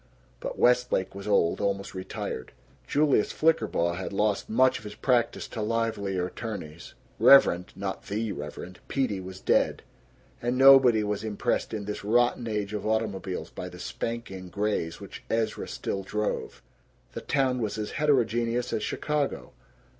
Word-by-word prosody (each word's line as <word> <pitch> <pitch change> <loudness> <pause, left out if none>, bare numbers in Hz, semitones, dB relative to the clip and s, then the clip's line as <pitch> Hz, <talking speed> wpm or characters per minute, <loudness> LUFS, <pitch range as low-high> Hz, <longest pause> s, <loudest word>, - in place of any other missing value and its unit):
But - - -5
Westlake 125 -6 +2
was 100 +1 -8
old, 90 -5 +2
almost 100 -1 -1
retired; 95 -8 -5 0.3
Julius 145 -7 +2
Flickerbaugh 110 - +1
had 95 - -4
lost 105 0 0
much 130 +3 +3
of - - -15
his 105 -1 -8
practice 125 -3 +1
to 115 - -5
livelier 105 -4 -1
attorneys; 90 -5 -7 0.2
Reverend 90 -10 +6
(not 95 -1 -5
The 110 +1 -2
Reverend) 80 +3 -7
Peedy 120 -8 -1
was 95 +1 -8
dead; - - +1 0.6
and 120 +1 0
nobody 130 -4 +7
was 105 0 -2
impressed 110 -2 -1
in 105 -2 -4
this 105 0 -5
rotten 120 +2 +2
age 105 -2 -2
of 105 - -3
automobiles 105 -4 -2
by - - -6
the - - -11
"spanking 95 -6 -5
grays" 100 -5 -2
which - - -10
Ezra 115 -1 -1
still 95 - -3
drove. 105 +2 -3 0.5
The - - -6
town 130 -3 +1
was 110 -1 -2
as 105 -1 -4
heterogeneous 120 -4 +1
as - - 0
Chicago. 150 +5 -2
105 Hz, 145 wpm, -27 LUFS, 95-120 Hz, 0.6 s, nobody